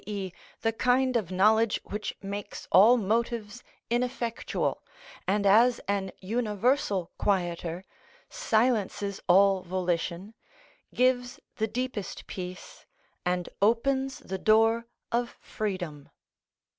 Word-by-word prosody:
e._, 195 Hz, -3 st, -4 dB, 0.3 s
the 225 Hz, 0 st, +1 dB
kind 255 Hz, +2 st, +2 dB
of 215 Hz, -7 st, 0 dB
knowledge 215 Hz, +4 st, +3 dB
which 210 Hz, +1 st, -5 dB
makes 200 Hz, +1 st, -6 dB
all 225 Hz, +6 st, +7 dB
motives 230 Hz, +1 st, -1 dB, 0.3 s
ineffectual, 240 Hz, -1 st, -1 dB, 0.5 s
and 200 Hz, +2 st, +1 dB
as 230 Hz, +5 st, +5 dB
an 195 Hz, -1 st, 0 dB
universal 210 Hz, -, 0 dB
quieter 175 Hz, -2 st, -1 dB, 0.4 s
silences 220 Hz, -, 0 dB
all 195 Hz, +1 st, +5 dB
volition, 180 Hz, +2 st, -2 dB, 0.6 s
gives 250 Hz, -1 st, +1 dB, 0.2 s
the 220 Hz, -1 st, 0 dB
deepest 235 Hz, -2 st, -4 dB
peace 180 Hz, 0 st, -8 dB, 0.4 s
and 180 Hz, -1 st, 0 dB
opens 265 Hz, +5 st, +2 dB
the 190 Hz, 0 st, -6 dB
door 225 Hz, +2 st, +3 dB, 0.2 s
of 240 Hz, 0 st, -1 dB
freedom. 180 Hz, -9 st, -5 dB
210 Hz, 100 wpm, -28 LUFS, 190-235 Hz, 0.6 s, all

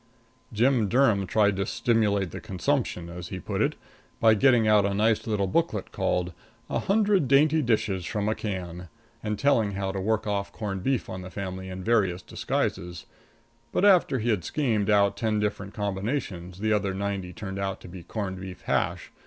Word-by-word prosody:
Jim 120 Hz, 0 st, +3 dB
Durham 110 Hz, -6 st, +3 dB
tried 105 Hz, 0 st, +3 dB
to 100 Hz, -, 0 dB
"stimulate 105 Hz, -5 st, +1 dB
the -, -, -7 dB
consumption," 105 Hz, -2 st, -1 dB
as 85 Hz, 0 st, -7 dB
he 95 Hz, -, -6 dB
put -, -, -3 dB
it, -, -, +1 dB, 0.4 s
by 110 Hz, -1 st, +6 dB
getting 120 Hz, 0 st, +4 dB
out 105 Hz, -1 st, +5 dB
a 100 Hz, 0 st, 0 dB
nice 110 Hz, +2 st, +2 dB
little 105 Hz, -3 st, +1 dB
booklet 105 Hz, -, -1 dB
called, 90 Hz, -1 st, -1 dB, 0.4 s
"A -, -, +1 dB
Hundred 200 Hz, -5 st, +2 dB
Dainty 150 Hz, +4 st, +4 dB
Dishes 105 Hz, -7 st, 0 dB
from 105 Hz, +3 st, -2 dB
a 110 Hz, -, +2 dB
Can," 90 Hz, -5 st, -5 dB, 0.3 s
and 105 Hz, -1 st, -2 dB
telling 115 Hz, -8 st, +2 dB
how 95 Hz, 0 st, -2 dB
to 95 Hz, -1 st, -3 dB
work 110 Hz, +2 st, 0 dB
off 100 Hz, -1 st, -2 dB
corned 100 Hz, -4 st, -4 dB
beef 130 Hz, +4 st, 0 dB
on 95 Hz, -, -6 dB
the 95 Hz, -, -8 dB
family 95 Hz, -1 st, -5 dB
in 95 Hz, 0 st, -6 dB
various 95 Hz, -6 st, +1 dB
disguises; 90 Hz, -2 st, -3 dB, 0.7 s
but, 195 Hz, -, +2 dB
after 185 Hz, -9 st, +5 dB
he 120 Hz, 0 st, -1 dB
had 100 Hz, -6 st, 0 dB
schemed 110 Hz, -, 0 dB
out 100 Hz, -1 st, +4 dB
ten 110 Hz, -2 st, 0 dB
different 105 Hz, -1 st, -3 dB
combinations, 100 Hz, -3 st, -3 dB
the 110 Hz, 0 st, +2 dB
other 100 Hz, -2 st, 0 dB
ninety 100 Hz, -2 st, -3 dB
turned 95 Hz, +1 st, -6 dB
out 95 Hz, -1 st, -2 dB
to -, -, -11 dB
be 90 Hz, 0 st, -9 dB
corned 95 Hz, -1 st, -5 dB
beef 95 Hz, -1 st, -8 dB
hash. -, -, -1 dB
100 Hz, 185 wpm, -26 LUFS, 95-115 Hz, 0.7 s, by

